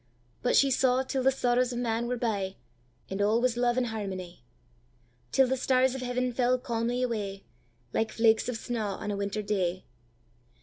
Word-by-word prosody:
But -, -, +2 dB
she 275 Hz, -1 st, +5 dB
saw 260 Hz, 0 st, +3 dB
till 265 Hz, 0 st, -2 dB
the 260 Hz, -, +4 dB
sorrows 250 Hz, -1 st, +1 dB
of 240 Hz, -, -4 dB
man 235 Hz, -1 st, -1 dB
were 250 Hz, 0 st, -1 dB
bye, 200 Hz, -5 st, -1 dB, 0.5 s
And 195 Hz, +1 st, -3 dB
all 215 Hz, +3 st, +3 dB
was 250 Hz, -1 st, +1 dB
love 240 Hz, 0 st, +1 dB
and 255 Hz, -, +2 dB
harmony; 190 Hz, -, -5 dB, 0.9 s
Till 265 Hz, -, +5 dB
the 260 Hz, -, +1 dB
stars 260 Hz, 0 st, +2 dB
of 265 Hz, -, -5 dB
heaven 250 Hz, 0 st, -1 dB
fell 250 Hz, +1 st, +2 dB
calmly 240 Hz, 0 st, -1 dB
away, 205 Hz, -5 st, -3 dB, 0.5 s
Like 220 Hz, -, 0 dB
flakes 225 Hz, +1 st, +3 dB
of 245 Hz, -, -2 dB
snaw 220 Hz, -4 st, -3 dB
on 210 Hz, -, -4 dB
a -, -, -2 dB
winter 200 Hz, +1 st, -2 dB
day. 185 Hz, -3 st, -1 dB
235 Hz, 180 wpm, -29 LUFS, 210-250 Hz, 0.9 s, she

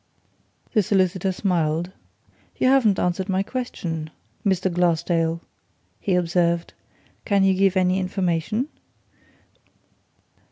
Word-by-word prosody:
The 215 Hz, -, +4 dB
solicitor 190 Hz, -1 st, +1 dB
smiled. 175 Hz, -2 st, 0 dB, 0.7 s
"You 255 Hz, -, +3 dB
haven't 240 Hz, -8 st, +4 dB
answered 180 Hz, +2 st, -1 dB
my 190 Hz, 0 st, +1 dB
question, 170 Hz, -10 st, -4 dB, 0.3 s
Mr. 190 Hz, -2 st, +1 dB
Glassdale," 170 Hz, -1 st, +1 dB, 0.6 s
he 190 Hz, -, 0 dB
observed. 170 Hz, -1 st, +1 dB, 0.5 s
"Can 200 Hz, -3 st, +2 dB
you 195 Hz, 0 st, +4 dB
give 195 Hz, 0 st, +2 dB
any 185 Hz, 0 st, +2 dB
information?" 190 Hz, -, -1 dB
185 Hz, 95 wpm, -23 LUFS, 170-195 Hz, 0.7 s, The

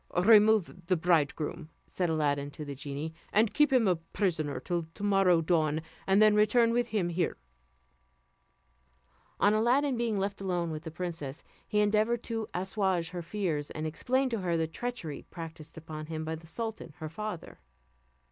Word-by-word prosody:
"Remove 210 Hz, -3 st, +5 dB
the 185 Hz, -1 st, +3 dB
bridegroom," 155 Hz, -2 st, 0 dB, 0.2 s
said 180 Hz, -2 st, -2 dB
Aladdin 145 Hz, -3 st, 0 dB
to 150 Hz, +1 st, -8 dB
the 140 Hz, -, -5 dB
genie, 140 Hz, +3 st, -5 dB, 0.2 s
"and 215 Hz, +1 st, +3 dB
keep 295 Hz, -1 st, +4 dB
him 250 Hz, -5 st, +4 dB
a 180 Hz, -2 st, +3 dB
prisoner 160 Hz, -4 st, -2 dB
till 175 Hz, -2 st, -2 dB
to -, -, -8 dB
morrow 195 Hz, -4 st, +4 dB
dawn, 155 Hz, -2 st, +2 dB, 0.3 s
and 195 Hz, +1 st, +4 dB
then 215 Hz, 0 st, +6 dB
return 230 Hz, +3 st, +4 dB
with 240 Hz, 0 st, +1 dB
him 205 Hz, -7 st, 0 dB
here." 170 Hz, 0 st, -1 dB, 2.0 s
On 205 Hz, -, +4 dB
Aladdin 250 Hz, +5 st, +2 dB
being 230 Hz, -3 st, 0 dB
left 195 Hz, +1 st, -2 dB
alone 175 Hz, -3 st, -1 dB
with 155 Hz, +1 st, -6 dB
the -, -, -4 dB
princess, 165 Hz, -4 st, -5 dB, 0.2 s
he 210 Hz, -1 st, +2 dB
endeavoured 215 Hz, +3 st, +2 dB
to 225 Hz, -2 st, -3 dB
assuage 190 Hz, -2 st, 0 dB
her 180 Hz, -1 st, -5 dB
fears, 165 Hz, -5 st, -2 dB
and 155 Hz, -, -5 dB
explained 255 Hz, -, 0 dB
to 230 Hz, -, -1 dB
her 175 Hz, -3 st, 0 dB
the 160 Hz, -, +1 dB
treachery 165 Hz, -, -5 dB
practiced 165 Hz, -2 st, -9 dB
upon 155 Hz, -1 st, -7 dB
him 160 Hz, -1 st, -4 dB
by 160 Hz, -, -3 dB
the 160 Hz, +1 st, -8 dB
sultan 220 Hz, -5 st, -5 dB
her 155 Hz, -, -5 dB
father. 180 Hz, -, -6 dB
180 Hz, 165 wpm, -30 LUFS, 160-215 Hz, 2.0 s, then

